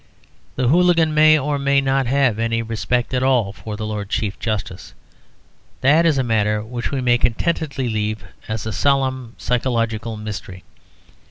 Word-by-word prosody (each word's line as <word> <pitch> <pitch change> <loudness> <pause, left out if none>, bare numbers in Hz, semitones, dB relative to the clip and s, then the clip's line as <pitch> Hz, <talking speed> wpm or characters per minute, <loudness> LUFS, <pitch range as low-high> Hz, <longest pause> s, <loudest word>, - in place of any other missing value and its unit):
The 125 -2 +1
hooligan 170 -1 +3
may 155 0 +6
or 145 0 -1
may 140 0 +3
not 135 -1 +1
have 130 -4 +2
any 115 0 0
respect 120 +3 -2
at 125 - +1
all 125 -7 +2
for 105 0 -7
the 110 - -4
Lord 105 -2 -4
Chief 105 -2 -2
Justice: 100 -5 -4 0.9
that 155 +5 +4
is 155 -4 +2
a 130 - +1
matter 105 -2 0
which 120 +2 -4
we 135 -2 -2
may 120 -1 +3
contentedly 140 +1 -1
leave 110 -1 -2 0.2
as 110 0 -4
a 110 - -3
solemn 130 -2 0
psychological 115 -3 -1
mystery. 100 -4 -7
120 Hz, 160 wpm, -20 LUFS, 110-135 Hz, 0.9 s, may